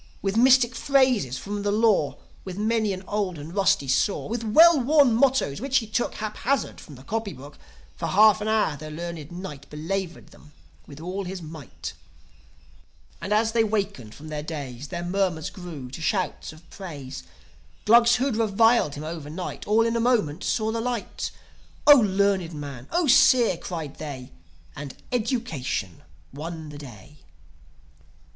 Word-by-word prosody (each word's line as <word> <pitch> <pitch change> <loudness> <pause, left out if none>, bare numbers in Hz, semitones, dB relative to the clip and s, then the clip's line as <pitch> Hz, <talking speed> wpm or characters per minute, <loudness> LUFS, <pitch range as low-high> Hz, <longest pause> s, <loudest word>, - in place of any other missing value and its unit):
With 195 0 -1
mystic 250 0 +5
phrases 255 - +2
from 205 +5 -5
the 205 0 0
Law, 210 -8 +2 0.3
With 185 -1 -7
many 220 0 +1
an 190 0 -5
old 200 -4 -2
and 150 +3 -9
rusty 195 -8 +2
saw, 140 +10 +1
With 230 +1 -3
well 315 +8 +6
worn 280 -1 +4
mottoes, 250 - +2
which 270 0 +1
he 235 - 0
took 220 +3 -2
Haphazard 220 +6 -2
from 145 - -12
the 130 - -14
copy 220 +3 -3
book, 145 +3 -13 0.4
For 165 - -3
half 215 +3 +5
an 210 - -2
hour 220 -8 +1
the 155 +2 -8
learned 165 -1 -7
Knight 160 -6 -8
Belaboured 175 +4 -4
them 150 0 -18 0.3
with 140 - -11
all 185 +4 -4
his 180 -1 -6
might. 155 -4 -8 1.3
And, 195 - -5
as 220 +1 +3
they 225 0 +3
wakened 200 - -3
from 155 +2 -11
their 150 -1 -4
daze, 145 -4 -6
Their 170 +1 -5
murmurs 175 -3 -1
grew 160 -9 -8
to 150 - -8
shouts 185 +2 -1
of 155 +2 -17
praise. 145 -9 -8 0.6
Glugs 235 +2 +6
who'd 255 -2 0
reviled 225 -6 +3
him 145 - -7
overnight 160 +2 -6
All 220 +2 +4
in 230 0 0
a - - +1
moment 220 -10 +1
saw 220 -1 0
the 230 0 -2
light. 240 -2 -3 0.6
"O 295 - +11
learned 195 -5 +1
man! 140 -4 -7
0 350 0 +2
seer!" 255 -6 +5
cried 165 -4 -6
they.... 135 -5 -7 0.4
And 140 -1 -7 0.2
education 215 - -2 0.3
won 160 +2 -7
the 145 -1 -9
day. 130 +1 -12
190 Hz, 160 wpm, -25 LUFS, 150-225 Hz, 1.3 s, O